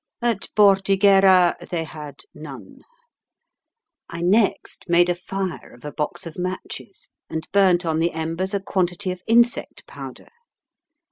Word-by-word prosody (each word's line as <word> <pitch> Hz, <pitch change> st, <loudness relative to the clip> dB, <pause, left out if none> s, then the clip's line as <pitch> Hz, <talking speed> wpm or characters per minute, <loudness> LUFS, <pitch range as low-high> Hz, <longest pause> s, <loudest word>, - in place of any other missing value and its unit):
At 230 Hz, -5 st, 0 dB
Bordighera 195 Hz, -2 st, +5 dB
they 170 Hz, -2 st, -2 dB
had 150 Hz, -2 st, -9 dB
none. -, -, -11 dB, 1.3 s
I 170 Hz, 0 st, -5 dB
next 200 Hz, +4 st, +1 dB
made 175 Hz, 0 st, +4 dB
a -, -, +3 dB
fire 185 Hz, -2 st, -5 dB
of 120 Hz, -, -16 dB
a 150 Hz, -, -5 dB
box 150 Hz, +6 st, -4 dB
of 165 Hz, +1 st, -8 dB
matches, 185 Hz, +1 st, -6 dB, 0.2 s
and 160 Hz, 0 st, -5 dB
burnt 185 Hz, -3 st, +4 dB
on 160 Hz, -1 st, 0 dB
the 170 Hz, +1 st, +1 dB
embers 165 Hz, +5 st, -3 dB
a -, -, +1 dB
quantity 185 Hz, 0 st, -1 dB
of 180 Hz, 0 st, -7 dB
insect 235 Hz, +1 st, +2 dB
powder. -, -, -10 dB
180 Hz, 135 wpm, -22 LUFS, 170-195 Hz, 1.3 s, Bordighera